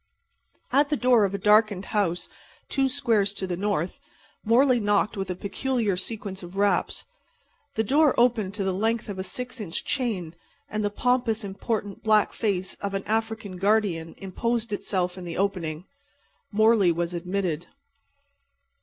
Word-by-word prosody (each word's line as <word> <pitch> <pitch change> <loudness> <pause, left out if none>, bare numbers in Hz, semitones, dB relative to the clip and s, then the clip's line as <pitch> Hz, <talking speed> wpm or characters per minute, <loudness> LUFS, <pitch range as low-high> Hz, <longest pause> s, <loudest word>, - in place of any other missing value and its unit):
At 285 +2 +4
the 295 - +1
door 245 -5 +4
of 195 0 -2
a - - 0
darkened 210 -1 +4
house 180 -5 0 0.4
two 270 -1 +2
squares 225 -7 +2
to 190 - -2
the 180 -1 -2
north 190 -2 -1 0.4
Morley 245 +3 +4
knocked 205 0 +1
with 195 -2 -3
a 180 - -2
peculiar 215 +2 -1
sequence 195 0 -4
of 175 +1 -10
raps. 200 0 +1 0.7
The 220 - +2
door 285 +5 +3
opened 225 -5 +2
to 205 - -1
the 190 -1 0
length 220 +3 0
of 195 -2 -5
a - - -1
six 250 +5 -5
inch 175 -5 -4
chain, 205 - -2 0.3
and 215 0 -2
the 205 - +1
pompous, 230 0 +1
important 200 +1 -3
black 215 -1 +3
face 195 -4 -1
of 200 -1 -2
an 195 - -2
African 220 -3 -2
guardian 195 -5 +1
imposed 230 +3 -2
itself 185 -2 -1
in - - -8
the 170 -1 -5
opening. 180 -4 -1 0.7
Morley 215 -3 +5
was 170 +1 -2
admitted. 175 -2 -2
205 Hz, 155 wpm, -26 LUFS, 185-225 Hz, 0.7 s, Morley